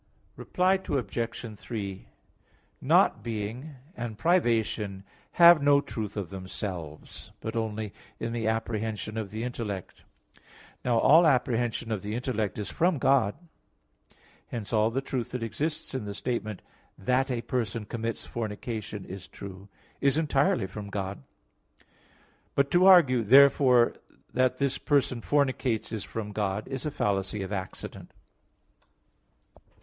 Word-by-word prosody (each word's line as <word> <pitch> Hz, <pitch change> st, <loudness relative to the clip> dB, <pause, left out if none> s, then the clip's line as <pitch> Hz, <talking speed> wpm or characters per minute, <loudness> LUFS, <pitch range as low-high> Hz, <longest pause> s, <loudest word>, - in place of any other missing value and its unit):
Reply 185 Hz, +1 st, +1 dB
Obj. 115 Hz, -5 st, -3 dB
3: 100 Hz, -2 st, -6 dB, 0.7 s
Not -, -, +4 dB
being 115 Hz, +6 st, -5 dB, 0.2 s
and 115 Hz, -3 st, -5 dB
privation 115 Hz, -, +1 dB, 0.3 s
have 170 Hz, -3 st, +8 dB
no 140 Hz, 0 st, +5 dB
truth 110 Hz, -7 st, -5 dB
of 100 Hz, -3 st, -4 dB
themselves, 95 Hz, -5 st, -7 dB
but 110 Hz, +1 st, -5 dB
only 110 Hz, -2 st, -3 dB, 0.3 s
in 115 Hz, -, -3 dB
the 115 Hz, -2 st, -2 dB
apprehension 110 Hz, -1 st, -2 dB
of 110 Hz, -3 st, -3 dB
the 110 Hz, +3 st, -5 dB
intellect. 110 Hz, -6 st, -5 dB, 0.8 s
Now 120 Hz, -2 st, +2 dB
all 160 Hz, +8 st, +6 dB
apprehension 120 Hz, -4 st, +1 dB
of 105 Hz, -4 st, -1 dB
the 105 Hz, +3 st, -4 dB
intellect 110 Hz, -5 st, -2 dB
is 105 Hz, -, -4 dB
from 175 Hz, -1 st, +2 dB
God. 130 Hz, -6 st, +3 dB, 1.1 s
Hence 115 Hz, -2 st, -5 dB
all 110 Hz, 0 st, +4 dB
the 130 Hz, +4 st, -1 dB
truth 130 Hz, -3 st, -3 dB
that 125 Hz, -2 st, -2 dB
exists 155 Hz, +8 st, -3 dB
in 130 Hz, -5 st, -3 dB
the 100 Hz, -1 st, -5 dB
statement 110 Hz, -2 st, -3 dB, 0.3 s
"that 130 Hz, +7 st, +1 dB
a 120 Hz, -2 st, -2 dB
person 115 Hz, -3 st, -2 dB
commits 115 Hz, +1 st, -4 dB
fornication 110 Hz, -2 st, -5 dB
is 95 Hz, 0 st, -8 dB
true" 95 Hz, 0 st, -10 dB, 0.3 s
is 140 Hz, +1 st, +3 dB
entirely 145 Hz, -9 st, +2 dB
from 100 Hz, +2 st, -7 dB
God. 100 Hz, -3 st, -4 dB, 1.3 s
But 140 Hz, 0 st, +2 dB
to 180 Hz, +2 st, +5 dB
argue, 140 Hz, -10 st, +7 dB
"Therefore 130 Hz, 0 st, +6 dB, 0.4 s
that 130 Hz, 0 st, +2 dB
this 140 Hz, -1 st, 0 dB
person 135 Hz, -5 st, +1 dB
fornicates 130 Hz, -6 st, 0 dB
is 110 Hz, -3 st, -3 dB
from 105 Hz, -2 st, -5 dB
God", 105 Hz, 0 st, -2 dB
is 135 Hz, +2 st, -3 dB
a -, -, 0 dB
fallacy 100 Hz, -5 st, -1 dB
of 95 Hz, -, -6 dB
Accident. 95 Hz, -2 st, -6 dB
115 Hz, 130 wpm, -28 LUFS, 105-130 Hz, 1.3 s, have